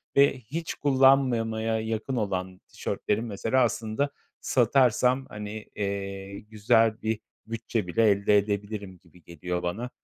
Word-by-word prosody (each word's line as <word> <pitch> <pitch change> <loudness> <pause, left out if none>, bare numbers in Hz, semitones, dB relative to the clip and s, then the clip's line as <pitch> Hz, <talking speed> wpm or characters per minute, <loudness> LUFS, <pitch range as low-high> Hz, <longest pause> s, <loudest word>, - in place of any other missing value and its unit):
ve 140 -1 +4
hiç 150 +8 -5
kullanmamaya 125 -5 +3
yakın 110 +4 -3
olan 95 -4 -3
tişörtlerim 110 +3 -2
mesela, 115 +4 +1
aslında, 115 +3 -1 0.3
satarsam, 125 +1 +3
hani, 105 -2 -7
eee, 100 -1 -4
güzel 110 +1 +2
bir 110 0 -1 0.3
bütçe 115 -2 -3
bile 110 +5 +3
elde 100 +1 +3
edebilirim 100 -1 -3
gibi 90 0 -21
geliyor 90 +2 -4
bana. 105 +8 -3
110 Hz, 120 wpm, -27 LUFS, 100-120 Hz, 0.3 s, ve